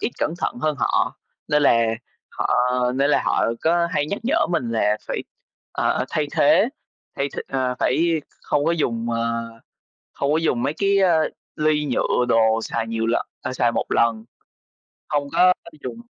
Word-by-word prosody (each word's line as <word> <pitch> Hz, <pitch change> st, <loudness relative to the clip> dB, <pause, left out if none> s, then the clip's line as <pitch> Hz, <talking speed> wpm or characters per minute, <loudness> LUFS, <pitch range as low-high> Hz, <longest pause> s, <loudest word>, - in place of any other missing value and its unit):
ít -, -, -1 dB
cẩn 160 Hz, -, -1 dB
thận -, -, -2 dB
hơn 155 Hz, -1 st, +1 dB
họ. -, -, +1 dB, 0.3 s
Nên 150 Hz, 0 st, +3 dB
là 115 Hz, -4 st, +4 dB, 0.4 s
họ -, -, -2 dB, 0.4 s
nên 140 Hz, +2 st, +2 dB
là -, -, +3 dB
họ -, -, +2 dB, 0.2 s
có 170 Hz, +1 st, +2 dB
hay 145 Hz, -5 st, 0 dB
nhắc 200 Hz, -, -3 dB
nhở 310 Hz, +7 st, +2 dB
mình 130 Hz, -9 st, -1 dB
là 105 Hz, -2 st, +1 dB
phải, -, -, -2 dB, 0.5 s
ờ, -, -, 0 dB
thay 150 Hz, -1 st, 0 dB
thế 200 Hz, +9 st, +4 dB, 0.5 s
thay 140 Hz, -, -1 dB
th -, -, -7 dB
ờ, 130 Hz, -2 st, -1 dB
phải 165 Hz, +4 st, +1 dB, 0.2 s
không 145 Hz, -1 st, 0 dB
có 165 Hz, -, +2 dB
dùng, 120 Hz, -7 st, -1 dB
ờ, 115 Hz, 0 st, -2 dB, 0.6 s
không 140 Hz, +1 st, -1 dB
có 155 Hz, -, +3 dB
dùng 140 Hz, -7 st, 0 dB
mấy 145 Hz, -, 0 dB
cái, 200 Hz, +1 st, +2 dB
a, 175 Hz, -4 st, +4 dB, 0.4 s
ly 150 Hz, -1 st, +1 dB
nhựa, 125 Hz, -1 st, +1 dB
đồ 115 Hz, -1 st, +3 dB
xài 115 Hz, 0 st, -3 dB
nhiều 115 Hz, 0 st, -2 dB
lần 115 Hz, -, +2 dB, 0.2 s
ờ, 130 Hz, -, -4 dB
xài 120 Hz, -2 st, +2 dB
một -, -, -1 dB
lần, 115 Hz, -1 st, +1 dB, 0.8 s
không 145 Hz, -1 st, -1 dB
có 180 Hz, 0 st, +5 dB, 0.3 s
dùng, 230 Hz, -, -6 dB
140 Hz, 180 wpm, -22 LUFS, 115-160 Hz, 0.8 s, có